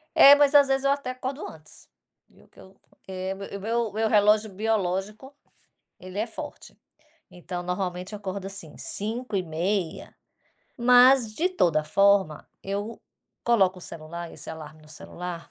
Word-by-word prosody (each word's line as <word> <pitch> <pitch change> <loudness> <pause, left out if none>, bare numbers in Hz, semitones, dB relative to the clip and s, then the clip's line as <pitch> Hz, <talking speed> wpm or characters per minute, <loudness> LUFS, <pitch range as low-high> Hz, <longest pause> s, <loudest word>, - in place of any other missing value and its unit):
É, 280 - +10
mas 290 0 +3
às 285 -1 +7
vezes 270 0 +1
eu 275 - +3
até 280 -2 -1
acordo 260 +3 -5
antes, - - -13 0.4
viu, - - -23
que - - -19
eu 190 +1 -17
porque 190 0 -6
meu 200 0 -8
meu 225 +1 -1
meu 220 +1 0
relógio 210 0 +3
biológico, 210 +4 -2 0.6
ele 185 +2 -9
é 215 - 0
forte. - - -9 0.6
Então, 180 0 -6
normalmente, 180 +1 -4
eu 210 - -5
acordo 195 -1 -5
assim, 195 -5 -8
5h30, 195 -5 -3 0.6
mas 250 -1 +6
de 345 +8 +1
toda 170 - +1
forma, 195 -1 +2 0.2
eu 205 +3 -4 0.4
coloco 190 -6 +3
o - - -12
celular, 165 +2 -8
esse - - -8
alarme 155 -1 -10
no 155 - -18
celular, 170 +2 -8
200 Hz, 145 wpm, -26 LUFS, 180-235 Hz, 0.6 s, É